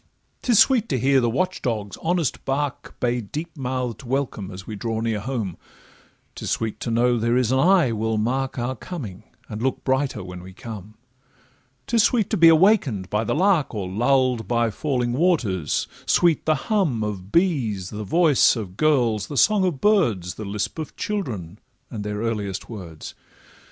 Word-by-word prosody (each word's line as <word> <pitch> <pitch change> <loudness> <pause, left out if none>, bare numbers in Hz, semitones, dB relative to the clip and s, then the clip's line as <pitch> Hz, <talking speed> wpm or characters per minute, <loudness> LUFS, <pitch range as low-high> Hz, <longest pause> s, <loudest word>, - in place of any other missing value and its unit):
'Tis 240 -4 +2
sweet 230 0 +4
to 135 - +1
hear 135 +2 +3
the 120 - +1
watch 185 +10 -1
dog's 105 -5 -2
honest 165 -7 -1
bark 140 +1 -3
Bay 120 0 0
deep 155 - -6
mouth'd 130 -4 -3
welcome 130 -6 -2
as 95 -1 -9
we 110 - -6
draw 110 +1 -3
near 115 -2 -1
home; 110 -6 -3 0.8
'Tis - - -6
sweet 110 -1 -2
to - - -4
know 120 +1 +2
there 115 +2 +1
is 125 -2 +1
an 130 - +3
eye 175 -4 +4
will 110 0 -1
mark 130 +5 -1
Our 120 +2 -2
coming, 115 - -8 0.2
and 105 0 -6
look 130 +1 -1
brighter 130 -4 0
when 90 -1 -8
we 95 +1 -11
come; 110 0 -9 0.9
'Tis 235 -1 +3
sweet 220 -1 +2
to 215 - +1
be 165 -1 +7
awaken'd 160 - +4
by 105 +1 +1
the 115 - -1
lark, 180 - +2
Or 100 -3 -3
lull'd 125 +3 +1
by 120 -2 +1
falling 125 -1 -1
waters; 125 - +1 0.2
sweet 170 -4 +3
the 155 - +4
hum 150 - 0
Of 100 -2 -5
bees, 125 - +1
the 105 0 -5
voice 155 - +4
of 100 -5 -6
girls, 120 -9 +2
the 145 - -5
song 210 +4 +4
of 170 -7 -1
birds, 115 - +2
The 110 - -7
lisp 105 +9 -3
of 155 - -6
children, 110 - -4 0.3
and 105 -3 -5
their 105 0 -3
earliest 105 -4 -3
words. 90 -9 -8
120 Hz, 175 wpm, -23 LUFS, 105-155 Hz, 0.9 s, be